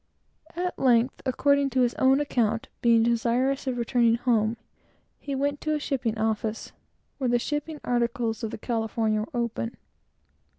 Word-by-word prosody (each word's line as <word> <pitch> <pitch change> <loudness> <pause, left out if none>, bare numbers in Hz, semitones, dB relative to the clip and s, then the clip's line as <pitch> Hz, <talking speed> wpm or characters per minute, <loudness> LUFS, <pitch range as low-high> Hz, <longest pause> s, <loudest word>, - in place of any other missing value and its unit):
At 360 +1 -3
length, 245 0 +3
according 280 +2 +2
to 260 -1 +1
his 240 -1 +2
own 265 +1 +5
account, 230 -6 0
being 230 -1 +5
desirous 240 +4 +1
of 255 -2 -1
returning 235 -1 +2
home, 230 -2 +1 0.6
he 280 -1 -4
went 285 +1 -1
to 310 0 0
a - - -1
shipping 245 -6 -2
office, 220 0 -2 0.5
where 260 -3 0
the 240 - +3
shipping 295 +4 -3
articles 235 -2 -1
of 225 - -1
the - - -6
California 225 -1 -1
were 215 - -6
open. 235 0 -3
240 Hz, 155 wpm, -26 LUFS, 230-270 Hz, 0.6 s, own